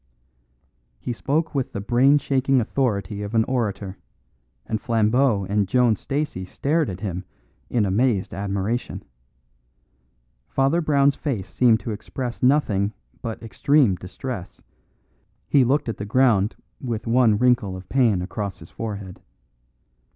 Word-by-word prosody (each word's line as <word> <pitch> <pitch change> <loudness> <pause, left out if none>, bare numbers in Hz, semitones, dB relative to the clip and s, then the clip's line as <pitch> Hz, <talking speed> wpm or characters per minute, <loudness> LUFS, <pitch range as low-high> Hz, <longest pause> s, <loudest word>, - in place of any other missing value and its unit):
He 120 - -3
spoke 155 +7 -1
with 135 -3 -2
the - - -3
brain 125 +7 +4
shaking 135 -1 +2
authority 105 -5 -1
of 105 +2 -5
an 110 - +5
orator, 105 -6 -2 0.7
and 110 -1 -3
Flambeau 115 -1 +2
and 100 0 +1
Joan 120 +1 +3
Stacey 140 -5 -3
stared 150 - 0
at 95 0 -6
him 95 -3 -3 0.5
in 115 -4 +1
amazed 100 +1 +1
admiration. 100 +4 -3 1.4
Father 135 +6 +1
Brown's 140 -3 +3
face 125 - -3
seemed 115 -4 +3
to 110 - -4
express 120 +3 -5
nothing 110 -7 +2 0.3
but 115 0 -5
extreme 135 0 +3
distress; 90 +3 -7 0.9
he 140 - +4
looked 135 +3 +1
at 115 - -3
the - - -5
ground 110 -3 +3 0.3
with 115 -4 -3
one 115 -2 +4
wrinkle 120 -5 +2
of 90 -1 -11
pain 115 -9 +2
across 100 0 -4
his 80 - -14
forehead. 100 -4 -6
115 Hz, 130 wpm, -23 LUFS, 100-130 Hz, 1.4 s, an